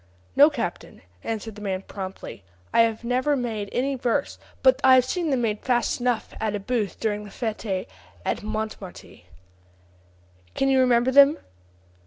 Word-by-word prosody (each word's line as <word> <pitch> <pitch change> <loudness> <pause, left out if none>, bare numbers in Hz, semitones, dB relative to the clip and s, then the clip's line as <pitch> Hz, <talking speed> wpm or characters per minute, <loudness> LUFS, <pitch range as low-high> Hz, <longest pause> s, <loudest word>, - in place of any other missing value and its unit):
"No, 290 +2 +8
captain," 230 - -5 0.2
answered 225 0 -4
the 210 - -12
man 190 -2 -3
promptly: 190 - -8 0.3
"I - - +6
have 225 0 +1
never 255 +4 +1
made 220 -5 -3
any 275 +3 0
verses, 225 - -1 0.2
but 260 +1 +5
I 260 -1 +8
have 255 -1 +4
seen 340 +4 -2
them 260 -4 +1
made 210 -2 -1
fast 245 -1 0
enough 245 -2 -1
at 215 -1 -1
a - - -2
booth 210 -1 -2
during 210 -1 -1
the 205 - -10
fete 215 -4 -3 0.4
of - - -1
Montmartre." 215 -3 -6 1.4
"Can 270 - +1
you 265 -1 +4
remember 250 0 +3
them?" 280 +3 +7
230 Hz, 160 wpm, -24 LUFS, 210-260 Hz, 1.4 s, No